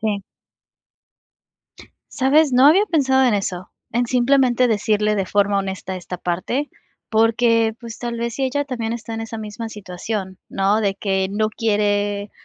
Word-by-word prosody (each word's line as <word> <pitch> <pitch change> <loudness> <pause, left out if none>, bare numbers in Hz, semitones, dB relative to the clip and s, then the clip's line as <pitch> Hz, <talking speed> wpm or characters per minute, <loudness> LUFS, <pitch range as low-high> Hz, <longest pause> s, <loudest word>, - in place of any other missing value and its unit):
Sí. 210 -2 -1 1.9
¿Sabes? 280 +2 +3
No 255 +2 +6
había 360 +8 +6
pensado 265 -7 +3
en 240 - +3
eso, 185 -2 -3 0.2
en 240 +1 +1
simplemente 250 0 +3
decirle 210 0 +1
de 195 -2 -1
forma 200 0 +2
honesta 190 -1 -4
esta 180 0 -7
parte, 210 +12 -2 0.4
porque 225 0 +3
pues 235 -2 -9
tal 235 -1 -4
vez 235 -1 -3
sí 270 - -1
ella 285 +2 -1
también 235 -5 -3
está 230 -1 -6
en 225 - -4
esa 225 0 -6
misma 220 +1 -6
situación, 190 -1 -6
¿no?, 195 +2 +1
de 200 -2 +1
que 190 -1 -1
no 215 +2 0
quiere, 205 -2 0
220 Hz, 155 wpm, -21 LUFS, 200-245 Hz, 1.9 s, No